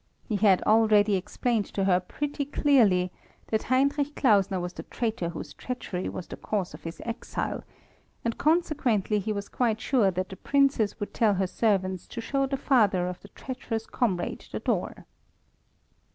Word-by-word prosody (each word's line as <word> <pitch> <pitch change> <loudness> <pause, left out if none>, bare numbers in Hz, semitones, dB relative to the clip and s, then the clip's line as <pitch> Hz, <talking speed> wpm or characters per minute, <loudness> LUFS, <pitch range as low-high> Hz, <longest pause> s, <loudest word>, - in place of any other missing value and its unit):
He 215 - 0
had 195 -2 +4
already 215 -2 +4
explained 215 +3 -1
to 195 - +1
her 185 -2 +4
pretty 285 +10 -3
clearly 230 - +3 0.4
that 220 - +1
Heinrich 280 +3 +2
Klausner 200 -6 +3
was 175 0 -4
the - - -7
traitor 220 -7 -2
whose 165 -3 -7
treachery 195 -6 -4
was 180 - -6
the - - -8
cause 200 -4 -2
of - - -10
his 165 +1 -6
exile, 230 +1 -3 0.6
and 230 - 0
consequently 280 - +1
he 210 +2 -2
was 200 -1 -3
quite 225 -3 0
sure 235 -7 +3
that 185 0 -3
the 190 - -8
Princess 275 -7 +2
would 205 - -5
tell 215 -3 +3
her 190 +1 +1
servants 190 -2 0
to 235 - -7
show 275 +4 0
the 275 0 -2
father 210 -10 +3
of 180 0 -5
the - - -12
treacherous 225 -1 -5
comrade 190 -9 -2
the - - -3
door. - - -2
215 Hz, 165 wpm, -27 LUFS, 190-255 Hz, 0.6 s, had